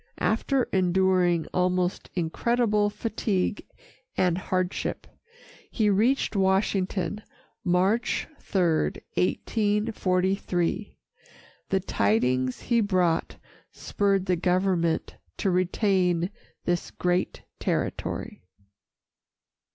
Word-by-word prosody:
After 255 +4 +1
enduring 180 -2 +2
almost 180 0 0
incredible 210 +5 +1
fatigue 210 -2 -2 0.5
and 180 -2 +3
hardship, 185 0 -2 0.6
he 215 -3 +2
reached 225 +6 +2
Washington 190 0 +1 0.4
March 190 +6 +1
3, 190 - -1 0.5
1843. 195 - 0 0.7
The 195 - +2
tidings 125 - +1
he 235 -1 +2
brought 180 -5 +1 0.3
spurred 195 -2 0
the 180 -2 +2
government 180 -1 0 0.2
to 195 - 0
retain 180 -1 +1 0.3
this 175 -1 -1
great 180 0 -1 0.2
territory. - - -3
185 Hz, 75 wpm, -26 LUFS, 175-205 Hz, 0.7 s, and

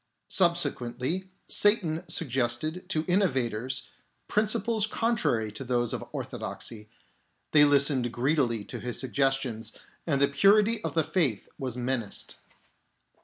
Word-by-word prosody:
Subsequently, 170 -1 0 0.2
Satan 180 -6 +3
suggested 155 +3 -1
to 155 -4 +1
inno 190 +3 +3
vators 125 0 -2 0.4
principles 215 +1 +1
contrary 210 - 0
to 105 +5 -6
those 120 -2 0
of - - -4
orthodoxy; 110 -2 -6 0.6
they 145 -1 +7
listened 140 -4 +3
greedily 125 -3 0
to - - -7
his 120 -1 -4
suggestions, 130 -4 -1 0.3
and 140 -4 +2
the 140 - +5
purity 210 +9 +3
of 160 -2 -4
the 160 - +3
faith 155 - 0
was 130 -3 -4
menaced. 125 -4 -3
140 Hz, 120 wpm, -28 LUFS, 120-175 Hz, 0.6 s, they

